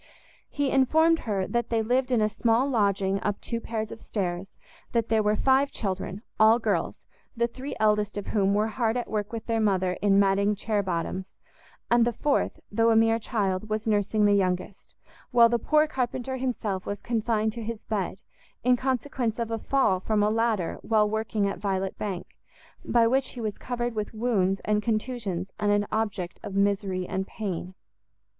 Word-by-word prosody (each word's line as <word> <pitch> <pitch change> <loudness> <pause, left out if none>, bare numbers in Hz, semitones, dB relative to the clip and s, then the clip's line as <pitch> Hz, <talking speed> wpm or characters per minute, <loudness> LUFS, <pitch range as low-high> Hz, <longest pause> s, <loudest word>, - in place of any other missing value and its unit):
He 285 -2 -1
informed 320 +5 +4
her 195 -2 0
that 235 +2 -1
they 225 -1 +1
lived 255 +3 +1
in 240 -3 +3
a 215 - +3
small 225 +4 +1
lodging 200 -5 +1
up 205 -1 -1
two 230 -1 -4
pair 225 -1 -3
of 220 +1 -7
stairs; 185 -1 -4 0.4
that 230 -1 +1
there 220 -1 +3
were 210 0 +2
five 270 +4 +3
children, 195 -1 -4 0.2
all 220 +1 +7
girls, 240 - -2 0.3
the 235 - +3
three 255 +4 -6
eldest 210 -1 +2
of 205 - -4
whom 200 -1 +1
were 210 +1 +2
hard 225 +1 0
at 245 - -4
work 210 -1 -2
with 230 -1 -5
their 225 -1 0
mother 190 -4 +1
in 200 -1 +4
matting 200 +1 +3
chair 210 +1 0
bottoms, 185 0 -3 0.6
and 240 0 +5
the 240 +1 +1
fourth, 290 +5 0
though 225 +2 +3
a 225 - +4
mere 225 0 +4
child, 210 -3 -1
was 215 0 -2
nursing 210 0 +2
the 205 - +5
youngest; 185 0 -1 0.3
while 235 -2 +6
the 235 0 +1
poor 305 +6 +3
carpenter 260 -2 -3
himself 225 -7 -2
was 205 0 -4
confined 220 -2 0
to 235 - -6
his 225 0 -5
bed, 200 -4 -2 0.5
in 250 +1 +5
consequence 255 -2 -1
of 230 -1 -3
a 225 - -1
fall 265 -9 +2
from 210 +2 +1
a 210 - +2
ladder 220 -5 0
while 215 -2 +2
working 220 -1 -1
at 195 - -4
Violet 195 -1 -2
Bank, 190 -4 -3 0.6
by 235 -1 +3
which 260 +3 +1
he 250 - -8
was 215 -3 -3
covered 240 -1 -3
with 215 0 -4
wounds 200 -5 +1
and 210 0 +2
contusions, 215 -5 -2
and 205 -1 +2
an 205 0 +2
object 205 -5 -2
of 195 - -7
misery 200 -2 +1
and 190 0 -3
pain. 185 -3 -5
215 Hz, 185 wpm, -27 LUFS, 200-235 Hz, 0.6 s, all